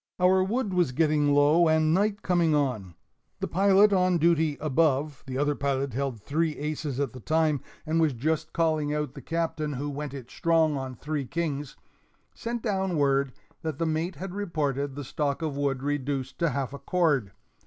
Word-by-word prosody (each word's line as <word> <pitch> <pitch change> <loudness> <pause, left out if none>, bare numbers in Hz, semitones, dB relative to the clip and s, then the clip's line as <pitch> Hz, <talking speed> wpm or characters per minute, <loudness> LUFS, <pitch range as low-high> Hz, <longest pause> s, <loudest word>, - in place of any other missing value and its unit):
Our 185 +1 +4
wood 210 +1 -1
was 175 -8 +2
getting 150 0 +2
low, 145 +4 +5
and 160 0 +3
night 205 +2 +1
coming 170 -4 +2
on. 115 - -1 0.4
The - - -2
pilot 200 +2 +4
on 185 -2 +3
duty 160 -2 +2
above 150 -1 +1
(the 130 -1 -4
other 145 +1 +2
pilot 140 -2 -1
held 135 -2 -2
three 155 +7 -1
aces 150 -2 -3
at 140 -5 -1
the 130 - -9
time, 155 +1 +1 0.2
and 165 +1 +1
was 155 -4 +2
just 155 +5 -1
calling 155 -3 +1
out 150 -3 -2
the - - -9
Captain, 165 -2 -2
who 145 +2 -3
"went 145 0 -5
it 130 -3 -9
strong" 165 -2 +2
on 130 -2 -4
three 150 +2 -3
kings) 150 -4 -3 0.6
sent 235 0 -4
down 190 -5 0
word 140 -2 +2 0.3
that 160 -4 -3
the 165 - 0
mate 160 +3 -1
had 180 +5 -6
reported 145 -8 -2
the 145 - -5
stock 145 +3 -2
of 155 -3 -2
wood 140 -2 -1
reduced 140 -2 -2
to 170 -1 +2
half 140 -2 -3
a 140 - -7
cord. 150 - +1
150 Hz, 185 wpm, -27 LUFS, 140-165 Hz, 0.6 s, low